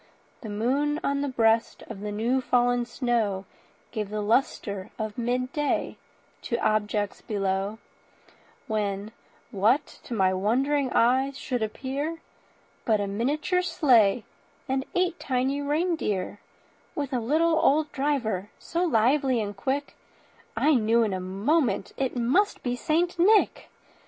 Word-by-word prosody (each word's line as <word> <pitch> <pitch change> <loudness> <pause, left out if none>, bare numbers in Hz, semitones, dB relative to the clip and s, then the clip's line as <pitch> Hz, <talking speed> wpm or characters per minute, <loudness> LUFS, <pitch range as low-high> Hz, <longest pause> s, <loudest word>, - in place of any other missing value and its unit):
The 220 - -7
moon 275 +8 0
on 280 0 0
the 285 - -1
breast 225 -3 +1
of 220 -3 -9
the 210 +1 -4
new 235 +5 0
fallen 245 -1 +2
snow 225 -8 -1 0.5
Gave 210 -3 -4
a 215 - -2
lustre 205 -3 0
of 215 -2 -4
midday 255 +4 -1 0.5
to 235 - -2
objects 210 -2 0
below; 195 0 -2 0.9
When 205 -1 -2 0.4
what 225 +9 +3 0.2
to 240 - -4
my 190 -3 +3
wondering 260 +8 +1
eyes 265 +4 +2
should 250 -4 -3
appear, 275 +8 -3 0.7
But 220 -2 +2
a 205 - 0
miniature 280 - 0
sleigh 250 - +3 0.4
and 265 0 -1
eight 360 -1 +1
tiny 265 +2 0
reindeer, 290 - -1 0.6
With 285 -2 -3
a 250 - +1
little 320 +7 +2
old 300 +1 +3
driver, 245 -9 -1
so 340 +1 -2
lively 260 -2 +2
and 205 -2 -3
quick 270 +8 -2 0.6
I 305 - +4
knew 230 -2 +3
in 210 -3 -1
a 185 - -2
moment 215 - 0
it 265 -1 -2
must 260 - +1
be 245 -1 -1
St. 340 +6 0
Nick. 415 +4 +3
245 Hz, 130 wpm, -26 LUFS, 215-285 Hz, 0.9 s, I